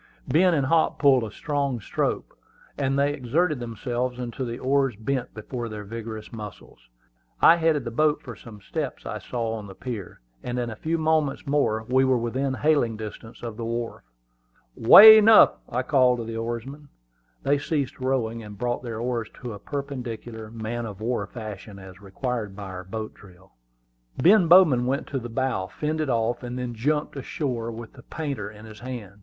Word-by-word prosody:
Ben 175 +2 +4
and 140 -3 +1
Hop 160 +3 +2
pulled 135 -4 +4
a 110 - -4
strong 140 0 -2
stroke, 100 - -2 0.4
and 135 -1 0
they 140 +1 +2
exerted 150 +3 0
themselves 120 +1 -3
until 125 +1 -4
the 120 0 -4
oars 135 -2 +1
bent 120 +4 -3
before 115 +2 -5
their 105 -1 -6
vigorous 110 +1 -7
muscles. 105 - -9 0.6
I 170 - +7
headed 160 -5 +1
the 115 - -4
boat 150 +5 +2
for 120 -3 -8
some 105 0 -13
steps - - -5
I - - -4
saw 115 -2 -3
on 105 -2 -6
the 95 - -11
pier, 115 -6 -7 0.2
and 125 0 -3
in 120 -2 -2
a - - -6
few 160 +9 -2
moments 155 -3 +1
more 135 -6 +1
we 130 +1 +3
were 130 -1 +3
within 130 +3 -1
hailing 140 -7 +2
distance 110 +2 -9
of 115 -2 -6
the 115 - -5
wharf. 115 +1 -4 0.7
"Way 220 - +10
enough!" 220 0 +7
I 125 +2 -1
called 125 -2 +3
to 120 - -4
the 115 0 -6
oarsmen. 120 +6 -5 0.5
They 140 +1 +2
ceased 140 -3 -2
rowing, 125 -3 -1
and 105 -2 -10
brought 120 +2 -2
their 115 -3 -5
oars 120 -2 -2
to 120 -3 -4
a 100 - -9
perpendicular, 120 -5 -6
man 115 +1 -4
of 100 -2 -9
war 110 -2 -2
fashion, 105 -2 -8
as 95 -1 -12
required 105 +1 -4
by 100 - -8
our 90 -1 -7
boat 110 +4 -6
drill. 95 -1 -18 0.7
Ben 185 +1 +5
Bowman 160 -9 +6
went 135 +3 -1
to 135 - -2
the 120 0 -7
bow, 115 -6 -1
fended 155 +3 -2
off, 115 0 0
and 125 0 -5
then 125 -1 -4
jumped 150 +7 -1
ashore 130 -4 -3
with 115 0 -9
the 130 - -14
painter 140 -9 -5
in 105 +1 -13
his 110 -1 -12
hand. 115 -6 -8
120 Hz, 185 wpm, -25 LUFS, 110-140 Hz, 0.7 s, Way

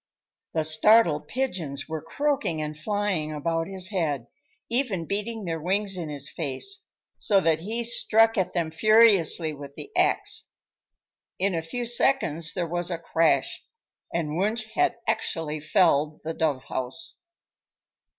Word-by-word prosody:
The 160 - +2
startled 160 0 +4
pigeons 175 - -3
were 160 -1 -4
croaking 280 - -1
and 150 0 -4
flying 185 -2 -1
about 165 +2 -1
his 190 -1 -2
head, 155 - -1 0.4
even 230 -9 -1
beating 210 +3 -3
their 165 -2 -3
wings 195 +3 0
in 170 -4 -4
his 140 -1 -6
face, 170 - -4 0.3
so 200 -2 +3
that 160 -2 +2
he 220 +7 -3
struck 225 -1 +3
at 190 -3 0
them 170 -3 -1
furiously 195 -5 +4
with 140 -1 -10
the 415 - -9
axe. - - +1 0.9
In 195 0 +1
a 165 - -1
few 240 +10 -4
seconds 230 - +1
there 180 -2 0
was 175 +1 -2
a 170 - -2
crash, 165 0 +1 0.5
and 160 -2 -2
Wunsch 220 +3 -1
had 360 0 +2
actually 155 -2 -1
felled 155 -2 +2
the 160 - -3
dove 150 -5 0
house. 130 +4 -4
170 Hz, 140 wpm, -26 LUFS, 155-215 Hz, 0.9 s, startled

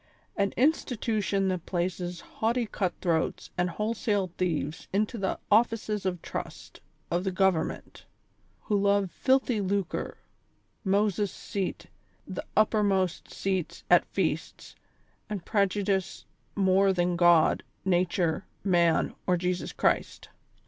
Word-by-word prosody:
An 200 -1 +1
institution 220 -8 +1
that 185 -2 -3
places 175 -1 -2
haughty 235 -2 -1
cut 190 -4 -1
throats 165 -3 -1
and 180 0 +1
wholesale 210 -1 -1
thieves 160 -3 -2
into 210 +4 0
the 190 - -1
offices 215 -2 +2
of 180 -2 -3
trust - - -7 0.3
of 175 +1 +1
the 190 - 0
govern 190 -3 +2
ment; - - -10 0.6
who 205 -2 0
love 200 -2 +2
filthy 260 -4 +2
lucre, 195 -2 -2 0.7
Moaes'' 200 0 +1
seat, 195 0 -4 0.4
the 185 - -5
uppermost 200 -4 +2
seats 190 -4 -2
at - - +7
feasts - - -3 0.5
and 200 -5 -4
prejudice 200 -2 0 0.3
more 195 0 +4
than 175 -1 +1
God, 170 -2 +5 0.2
Xature, 175 -2 +1 0.2
Man 175 -4 +3
or 180 -1 +3
Jesus 180 +1 -2
Christ. - - 0
190 Hz, 115 wpm, -28 LUFS, 180-210 Hz, 0.7 s, at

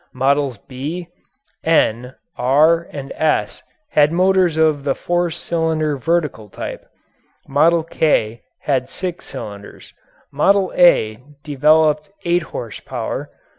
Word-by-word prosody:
Models 135 -1 +1
"B," 150 - -6 0.5
"N," 125 -6 +1 0.2
"R," 155 +6 +3
and 140 -1 -7
"S" 155 -1 -1 0.3
had 150 0 +4
motors 185 -1 +2
of 155 -3 +2
the 140 -1 0
four 175 0 -1
cylinder 160 -2 -1
vertical 150 -7 -1
type. - - -7 0.6
"Model 160 +4 +3
K" 130 -9 0 0.2
had 130 -3 -1
six 180 -2 -5
cylinders. 100 -1 -9 0.4
"Model 190 +7 +2
A" 110 -11 +4 0.2
developed 150 +2 +2 0.2
eight 175 +1 +2
horsepower. 115 -3 -5
150 Hz, 105 wpm, -19 LUFS, 135-170 Hz, 0.6 s, had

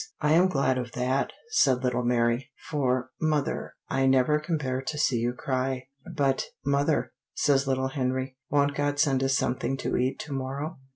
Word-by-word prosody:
'" - - -52
"I 150 0 +1
am 175 +3 +6
glad 135 -6 +1
of 120 -2 -5
that," 130 +2 0 0.2
said 130 - +3
little 125 -1 +1
Mary, 120 +1 +1 0.2
"for, 130 -4 0
mother, 155 -3 -1
I 135 0 +1
never 135 +3 +4
can 160 +2 -1
bear 130 -3 -2
to 150 +3 -4
see 135 -4 +2
you 120 +1 0
cry." 130 0 -2 0.2
"But, 140 -4 +1 0.2
mother," 140 +2 +1 0.2
says 140 -1 +2
little 130 0 0
Henry, 130 0 -2
"won't 145 0 +2
God 145 0 -1
send 135 -3 +2
us 135 0 +2
something 125 +1 -1
to - - -1
eat 130 +2 0
to 150 - -6
morrow?" 135 +3 -4
135 Hz, 180 wpm, -27 LUFS, 130-145 Hz, 0.2 s, am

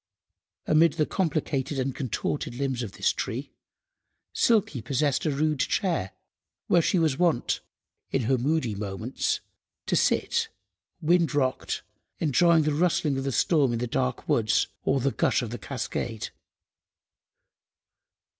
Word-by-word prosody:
Amid 160 +1 +4
the 155 -2 +1
complicated 150 -6 -1
and 130 0 -1
contorted 130 -1 -3
limbs 130 -2 -1
of 110 -5 -5
this - - +1
tree, 130 +6 -4 0.8
Silky 215 - +2
possessed 140 +3 0
a - - +3
rude 150 0 0
chair, 170 - 0 0.5
where 170 - +4
she 180 - +1
was 160 -5 +1
wont, 170 -9 +2 0.5
in 135 - 0
her 130 +2 +2
moody 135 -3 0
moments, 105 +4 -2 0.4
to - - 0
sit—wind–rocked—enjoying 155 - 0
the 150 0 +1
rustling 150 -3 +1
of 135 - -4
the 135 - 0
storm 140 -2 +2
in - - 0
the 120 - -1
dark 65 - -2
woods, - - +2 0.2
or 135 - +1
the 135 +2 +1
gush - - +1
of 115 - -5
the 120 - -5
cascade. 120 -4 -4
140 Hz, 125 wpm, -27 LUFS, 120-160 Hz, 0.8 s, Amid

